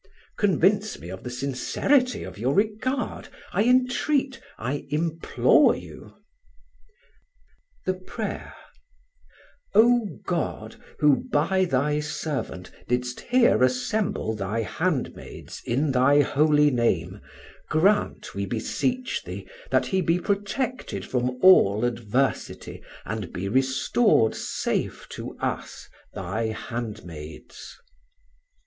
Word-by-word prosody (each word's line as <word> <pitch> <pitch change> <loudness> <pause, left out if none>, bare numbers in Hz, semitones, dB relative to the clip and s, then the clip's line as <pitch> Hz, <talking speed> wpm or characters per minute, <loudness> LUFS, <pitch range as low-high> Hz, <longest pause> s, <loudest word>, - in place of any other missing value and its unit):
Convince 205 +2 +2
me 85 - -10
of 95 +1 -7
the 125 - -6
sincerity 140 - 0
of - - -9
your 130 +5 0
regard, 220 +4 -1 0.3
I 205 +4 +2
entreat, 260 +2 +2 0.2
I 135 +5 -4
implore 160 +2 +3
you. - - -11 1.7
[The 185 - +1
Prayer:] 185 0 -6 1.2
"O 235 0 +5 0.2
God, - - -3 0.2
who 145 -2 +3
by 185 +6 +2
Thy 150 0 +1
servant 150 - -4 0.2
didst 125 0 -1
here 245 - +3
assemble 130 - 0
Thy 105 +3 -2
handmaids 160 0 -3
in 135 +5 +1
Thy 135 +3 +5
Holy 150 +1 +3
Name, 95 -6 0 0.5
grant, 195 +7 +1
we 100 0 -3
beseech 250 - -1
Thee, - - -7 0.2
that - - +2
he 190 -2 0
be 170 0 +2
protected 205 +7 -2
from 125 0 -1
all 115 - +6
adversity, 120 +2 -2 0.2
and 105 -5 -4
be 95 +2 -4
restored 130 - +3
safe - - -3
to - - -7
us, - - -4 0.3
Thy 100 +5 -2
handmaids." 105 -9 -7
145 Hz, 105 wpm, -25 LUFS, -, 1.7 s, all